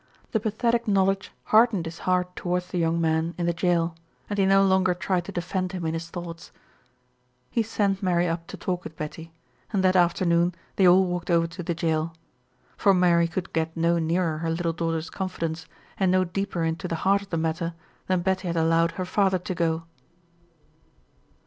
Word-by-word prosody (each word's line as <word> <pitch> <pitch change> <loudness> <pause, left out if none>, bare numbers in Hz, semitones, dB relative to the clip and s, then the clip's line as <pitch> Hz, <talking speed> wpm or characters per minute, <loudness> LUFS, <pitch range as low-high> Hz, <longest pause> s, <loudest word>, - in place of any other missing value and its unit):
The 220 - +2
pathetic 230 +2 0
knowledge 195 -1 +2
hardened 215 -5 +4
his 165 +1 -7
heart 180 0 +1
toward 180 0 -1
the 180 0 -4
young 165 0 +1
man 160 +1 0
in 175 - -1
the 170 - +1
jail, 170 -1 +1 0.4
and 205 - -1
he 195 - +4
no 195 0 +5
longer 190 -1 +3
tried 180 -1 -1
to 200 - -6
defend 185 +1 -2
him 180 -3 -4
in 160 - -1
his 165 0 -4
thoughts. 170 -1 -8 1.0
He 230 - +2
sent 205 -3 0
Mary 180 -2 +2
up 165 0 -3
to - - -8
talk 180 -1 -3
with 160 0 -9
Betty, 160 +2 -7 0.4
and 195 -2 +1
that 185 0 +4
afternoon 175 0 +3 0.2
they 190 - +5
all 185 +2 +6
walked 180 -1 -3
over 170 -1 +4
to 170 +2 -7
the 170 0 -2
jail; 160 -1 -1 0.6
for 195 -2 +4
Mary 170 -2 +4
could 175 +1 -5
get 160 0 -1
no 170 +1 +2
nearer 165 -1 0
her 165 0 -2
little 165 0 -1
daughter's 165 -1 -2
confidence, 165 -4 -4 0.3
and 190 -2 +3
no 185 0 +4
deeper 185 -1 -2
into 165 +3 -2
the 165 - -2
heart 200 +1 +4
of 200 - -13
the 165 - -1
matter 165 +1 -2 0.3
than 185 -1 +1
Betty 190 0 0
had 170 -1 -1
allowed 165 +1 +3
her 185 - -3
father 190 0 +2
to 180 +1 -5
go. 165 -2 0
175 Hz, 195 wpm, -25 LUFS, 165-190 Hz, 1.0 s, all